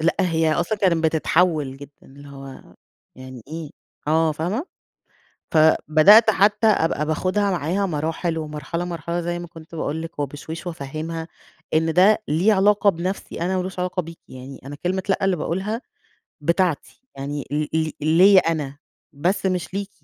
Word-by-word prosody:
لأ، 165 +2 +2
هي 165 -3 +2
أصلًا 215 +6 -1
كانت 170 -5 +2
بتتحول 160 -3 +1
جدًا، 145 +1 -12
اللي 140 +1 -14
هو 135 -1 -11 0.4
يعني 130 -2 -10
إيه، 160 -1 -6 0.4
آه، 160 +1 +2
فاهمة؟ 180 - -3 0.9
فبدأت 160 +7 +6
حتى 210 +2 +3
أبقى 160 -7 +2
باخُدها 185 +6 0
معاها 180 +3 0
مراحل 160 +1 -2
ومرحلة 155 +3 -4
مرحلة، 170 0 -3
زي 175 0 -3
ما 175 - -7
كُنت 165 -1 -13
باقول 160 0 -3
لِك، 165 -1 -9
وبشويش، 150 +4 -5
وأفهّمها 160 +1 -5 0.5
إن 160 +1 +2
ده 205 +5 +5
ليه 175 +9 +3
علاقة 205 +1 +4
بنفسي 180 +1 -5
أنا، 185 +2 0
وما 180 - 0
لوش 185 0 -7
علاقة 180 0 -1
بيكِ، 165 0 -11
يعني 130 +1 -10
أنا 145 +1 -8
كلمة 190 +1 0
لأ 195 - +1
اللي 195 -2 +2
باقولها 190 +8 -3 0.6
بتاعتي، 170 - -1
يعني 140 +1 -4
ل 150 +1 -1
ل 160 -1 -1
ليّا 185 +4 +7
أنا 150 -4 -2 0.4
بس، 175 +8 -1
مش 185 -1 -2
ليكِ. 200 0 -3
165 Hz, 155 wpm, -22 LUFS, 150-185 Hz, 0.9 s, ليّا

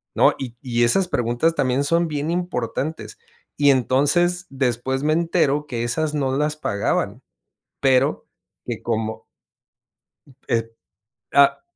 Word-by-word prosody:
no?". - - +5
Y 125 -3 -6
y 120 -3 0
esas 180 +10 +3
preguntas 120 +4 0
también 130 0 +1
son 170 +3 +1
bien 150 0 -3
importantes. 160 -3 -3 0.4
Y 145 -1 +5
entonces 145 - +2
después 130 0 -1
me 155 - +2
entero 160 -3 +1
que, 120 -4 -3
esas 150 +6 -1
no 135 -3 0
las 150 +1 0
pagaban, 100 -9 -1 0.6
pero 135 +1 +2 0.4
que - - -5
como 110 0 -3 1.2
y - - +1
ep 115 0 -2 0.6
ah 140 0 +5
140 Hz, 130 wpm, -22 LUFS, 120-155 Hz, 1.2 s, no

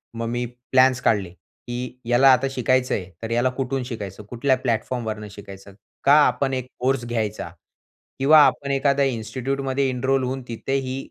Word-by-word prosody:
मग 115 0 -3
मी 120 +1 -2 0.3
प्लॅन्स 130 -1 +4
काढले, 100 -7 +1
की 125 +6 -9
याला 125 +3 +5
आता 130 +2 +1
शिकायचं 130 0 +1
आहे, 95 -1 -5
तर 115 - -4
याला 120 +2 +2
कुठून 135 -1 -2
शिकायचं? 105 -5 -7
कुठल्या 130 +2 +1
प्लॅटफॉर्म 120 -1 -2
वरून 105 -1 -4
शिकायचं? 100 -1 -12 0.3
का 140 - +5
आपण 130 +2 -1
एक 130 -1 -3
कोर्स 130 -1 0
घ्यायचा? 110 -3 -3 0.7
किंवा 150 +3 +7
आपण 140 -1 0
एखाद्या 140 0 +2
इन्स्टिट्यूटमध्ये 130 +3 -2
एनरोल 130 +1 0
होऊन 130 +1 -3
तिथेही 130 +2 -3
125 Hz, 155 wpm, -23 LUFS, 115-135 Hz, 0.7 s, किंवा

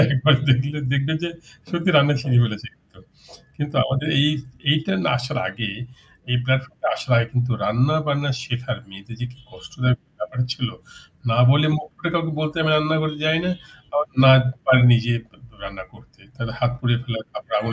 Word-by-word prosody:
একবার 140 +2 +4
দেখলে 135 +4 +2
দেখবেন 140 +3 0
যে 170 - -1 0.4
সত্যি 175 +1 0
রান্না 145 +1 +5
শিখে 125 -2 +3
ফেলেছে 110 -2 -4
কিন্তু। - - -28 0.6
কিন্তু 145 0 -5
আমাদের 135 +3 -2
এই 145 +2 +5 0.4
এইটা 155 +5 +1
না - - +2
আসার 125 0 -3
আগে 110 -4 -4 0.6
এই 125 - +3
platform 130 +3 0
টা - - +1
আসার 130 - -4
আগে 115 0 +3
কিন্তু 125 0 0
রান্না-বান্না 145 +4 +1
শেখার 125 -2 -4
মেয়েদের 100 +4 -12
যে 125 - -2
কি 125 - -21
কষ্টদায়ক 125 +6 -2 0.2
ব্যাপার 125 +4 -7
ছিল। 125 -1 -3 0.6
না 115 - +1
বলে 150 +3 +4
মুখ 150 - -6
ফুটে 175 0 -3
কাউকে 165 -1 -1
বলতে 155 0 -2
আমি 155 - +2
রান্না 155 +1 +1
করে 155 -1 -2
যাই 155 +1 +3
না। 180 - 0 0.4
আবার 150 +1 +1 0.2
না 135 - +9 0.4
পারি 130 -1 +7
নিজে 120 0 +3 0.5
রান্না 100 -1 -8
করতে। - - -22
তাহলে 115 -4 -5
হাত 120 -1 +1
পুড়িয়ে 120 -2 0
ফেলার, 115 -3 -5
তারপর - - -10
আগুন 115 +2 -3
130 Hz, 180 wpm, -22 LUFS, 120-150 Hz, 0.6 s, না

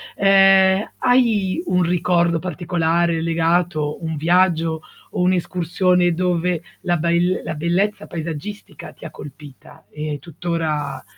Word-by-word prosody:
ehm, 195 0 +4
hai 235 - +2
un 180 - +1
ricordo 170 -1 +1
particolare 170 -2 -1
legato, 165 -2 0
un 160 0 -3
viaggio 165 0 +1 0.3
o - - -2
un'escursione 180 0 +1
dove 180 -1 -1 0.2
la 175 -1 0
ba 170 +2 -1
il 175 +2 +1
la 160 - -4
bellezza 180 +7 -1
paesaggistica 165 +5 -7
ti - - -14
colpita, 145 -1 -13
e 150 -1 -5
tuttora 160 -4 -3
175 Hz, 115 wpm, -20 LUFS, 160-185 Hz, 0.3 s, ehm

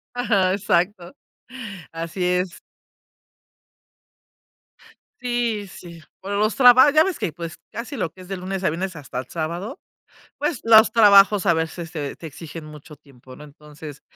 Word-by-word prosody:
Ajá, 200 -7 +1
exacto. 185 -2 -1 0.8
Así 165 +3 -5
es. 180 0 -1 2.6
Sí, 240 -4 -2
sí. 170 -2 -12 0.2
Por 195 +2 -6
los 210 +1 +1
traba 255 +2 +7
ya 310 +2 +5
ves 385 -1 -2
que 165 - -2
pues 165 0 -8 0.2
casi 235 +4 -7
lo 185 -9 -2
que 185 - -16
es 180 - -13
de 195 - -4
lunes 190 +1 -5
a - - +2
viernes 180 +3 -4
hasta 135 -3 -6
el 125 - -7
sábado, 170 +5 -5 0.6
pues, 295 -1 -2
los 220 -1 +6
trabajos 205 -2 +6
a 170 - +4
veces 165 +1 -4
te 150 -4 -5
te 165 - -11
exigen 160 +1 -9
mucho 150 0 -12
tiempo, 130 -3 -17
¿no? 150 - -13
Entonces 150 0 -12
180 Hz, 155 wpm, -22 LUFS, 160-210 Hz, 2.6 s, traba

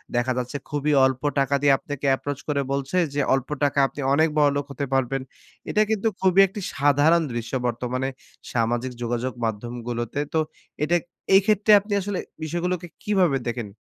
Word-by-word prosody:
দেখা 120 +1 +1
যাচ্ছে 125 +3 -3
খুবই 150 0 0
অল্প 130 -1 0 0.2
টাকা 140 +1 +2
দিয়ে 145 -1 +5
আপনাকে 145 -1 -6
approach 145 +1 -5
করে 145 -2 0
বলছে 140 +5 -1 0.2
যে, 145 - +1
"অল্প 135 -1 -1
টাকা 140 0 +2
আপনি 145 - -8
অনেক 160 +3 +4
বড়লোক 145 -1 +2
হতে 140 0 -3
পারবেন।" 135 0 +1 0.5
এটা 210 - +2
কিন্তু 220 0 +1
খুবই 190 0 +4
একটি 200 +2 -7
সাধারণ 145 +4 +4
দৃশ্য 120 +1 -5
বর্তমানে, 125 +2 -2 0.4
সামাজিক 120 +2 0
যোগাযোগ 120 +2 -2
মাধ্যমগুলোতে। 120 +3 -4
তো 160 - +3 0.4
এটা 165 +3 +2 0.4
এইক্ষেত্রে 205 +2 +4
আপনি 205 +1 -5
আসলে 200 0 -3 0.2
বিষয়গুলোকে 175 +2 -2 0.2
কীভাবে 185 -9 +2
দেখেন? 120 -3 -3
140 Hz, 155 wpm, -24 LUFS, 125-170 Hz, 0.5 s, দিয়ে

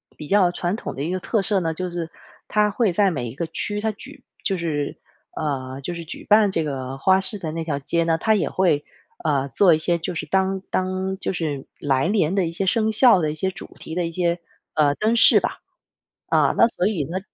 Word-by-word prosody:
比 - - -8
较 195 -1 +4
传 175 +3 -2
统 - - -6
的 135 - -3
一 165 - -2
个 185 - -1
特 220 +3 0
色 195 0 +1
呢， 165 -2 -1
就 180 +2 -3
是 170 -2 -4 0.4
它 210 -1 +2
会 210 -4 +1
在 195 0 +3
每 125 -6 -3
一 120 - -10
个 170 - -2
区， 205 +5 -3
它 220 - 0
举 210 - -10 0.2
就 195 - +1
是 150 -4 -2 0.4
呃， 135 -3 -3
就 175 +5 -4
是 170 -1 -7
举 - - -8
办 210 -1 +5
这 165 -3 0
个 135 -2 -4
花 190 +7 +4
市 205 +2 -2
的 165 -5 -5
那 165 0 -4
条 150 -3 -1
街 170 +4 0
呢， 165 -1 +2
它 220 +5 +2
也 175 -9 +1
会， 170 -6 +1 0.4
呃， 140 -3 +1
做 180 0 +5
一 - - +3
些 170 +2 0
就 175 +2 -4
是 160 - -3
当 190 +3 0
当 185 +1 -1
就 190 - -2
是 150 -6 -3
来 135 +2 +1
年 190 -4 +2
的 195 -3 +2
一 165 - -4
些 190 +3 -1
生 220 +3 +2
肖 220 -2 +6
的 155 - 0
一 150 - -4
些 190 +4 -1
主 185 - -10
题 160 - -7
的 175 0 0
一 - - -6
些， 170 0 0 0.4
呃， 145 -2 +3
灯 220 +2 +1
饰 - - +6
吧。 - - -2 0.7
啊， - - +3
那 - - +7
所 195 -4 -1
以 190 -9 -1
呢 180 +6 -3
175 Hz, 255 characters per minute, -23 LUFS, 155-195 Hz, 0.7 s, 那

